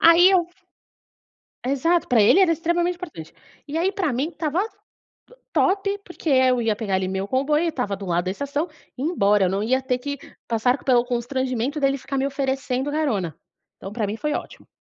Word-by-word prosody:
aí 335 +3 +7
eu 365 -3 +3 1.2
Exato, 305 +6 +1
pra 240 -4 +4
ele 215 - +6
era 370 -3 +5
extremamente 345 +2 0
importante, 310 - -9 0.3
e 300 +2 -3
aí, 360 +4 +1
pra 370 -8 -1
mim 270 +6 -1
estava, 315 0 -2 0.7
to - - -18
top 395 +1 +1
porque, 350 -2 -5
eh, 260 -2 +5
eu 250 -1 +1
ia 225 -2 +1
pegar, 205 -2 -3
ali, 185 0 0
meu 190 +1 -2
comboio, 295 +7 +1
estava 250 -11 -2
do 195 - -7
lado 175 0 0
da 185 - 0
estação 285 - -3 0.3
e - - -6
ir - - 0
embora, 210 - +3
eu - - +1
não 195 +2 -1
ia 260 +4 +1
ter 255 -1 0
que 285 +3 -5 0.3
passar 245 +4 +1
pelo 245 -3 +4
constrangimento 255 +2 -2
dele 275 0 +2
ficar 270 +1 -4
me 265 - +1
oferecendo 270 -1 -1
carona, 220 - -1 0.4
então 195 - -8
pra 215 -1 -2
mim 205 - -3
foi 300 +6 -2
ótimo. - - -6
270 Hz, 200 wpm, -23 LUFS, 225-320 Hz, 1.2 s, aí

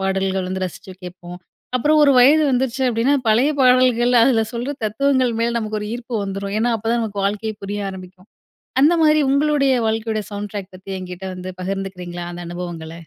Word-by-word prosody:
பாடல்கள் 190 -1 -1
வந்து 190 0 -2
ரசிச்சு 185 +1 -8
கேட்போம். 180 0 -9 0.4
அப்புறம் 300 +5 +3
ஒரு 290 - +6
வயது 285 +5 +6
வந்துருச்சு 260 0 0
அப்படின்னா, 240 +4 +2
பழைய 240 +7 +4
பாடல்கள், 250 -1 +4
அதுல 230 -3 +3
சொல்ற 245 +4 -3
தத்துவங்கள் 255 +3 +1
மேல 235 0 0
நமக்கு 215 -1 -3
ஒரு 210 - -5
ஈர்ப்பு 240 0 -7
வந்துரும். 195 +1 -4
ஏன்னா 235 +2 +1
அப்ப 220 - -10
தான் 235 0 +1
நமக்கு 205 -3 -3
வாழ்க்கையே 210 +2 -3
புரிய 205 0 -4
ஆரம்பிக்கும். 185 +1 -12 0.5
அந்தமாதிரி 310 0 +4
உங்களுடைய 280 -1 +2
வாழ்க்கையோட, 220 0 -1
"சவுண்ட் 205 0 -5
டிராக்" 200 -2 -6
பத்தி 190 +1 -11
என்கிட்ட 180 0 -8
வந்து 180 0 -7
பகிர்ந்துக்கிறீங்களா, 180 -2 -5
அந்த 175 - -8
அனுபவங்கள? 170 -2 -6
215 Hz, 170 wpm, -20 LUFS, 190-250 Hz, 0.5 s, ஒரு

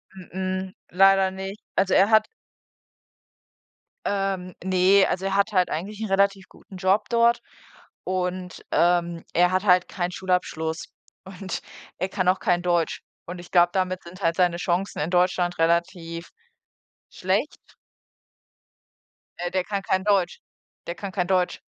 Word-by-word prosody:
Mh-mh, 185 0 -4 0.2
leider 195 +1 +5
nicht. 195 +2 -7
Also, 190 0 +2
er 195 +2 +5
hat 220 -1 +5 1.8
ähm, 195 -3 -2
ne, 190 +1 +4
also, 190 +1 -2
er 195 0 -1
hat 200 +2 +2
halt 185 -3 +2
eigentlich 200 +7 -4
'nen 220 -2 -4
relativ 195 0 +1
guten 190 - -14
Job 190 +3 +1
dort 235 0 +3 0.6
und, 180 0 -3
ähm, 170 -1 +2
er 180 +1 +4
hat 185 +1 +1
halt 180 -2 +4
keinen 175 -1 -3
Schulabschluss 175 -3 -2 0.4
und 190 0 -6 0.4
er 190 - -1
kann 185 -2 -1
auch 185 +1 +3
kein 175 -1 +1
Deutsch. 175 -2 0 0.2
Und 175 +1 -7
ich 175 - -12
glaube, 175 -1 +5
damit 185 -1 -1
sind 180 +3 -12
halt 165 -2 +1
seine 180 -2 +2
Chancen 180 +2 -1
in 150 +3 -1
Deutschland 180 0 +1
relativ 170 0 -1 0.8
schlecht. 195 +10 -1 1.8
Äh, 175 0 -3
der 185 -1 0
kann 200 +1 -3
kein 190 -1 0
Deutsch. 195 -4 +1 0.5
Der 170 - -4
kann 200 -2 -6
kein 180 -2 -1
Deutsch. 185 -1 +1
185 Hz, 145 wpm, -24 LUFS, 175-195 Hz, 1.8 s, leider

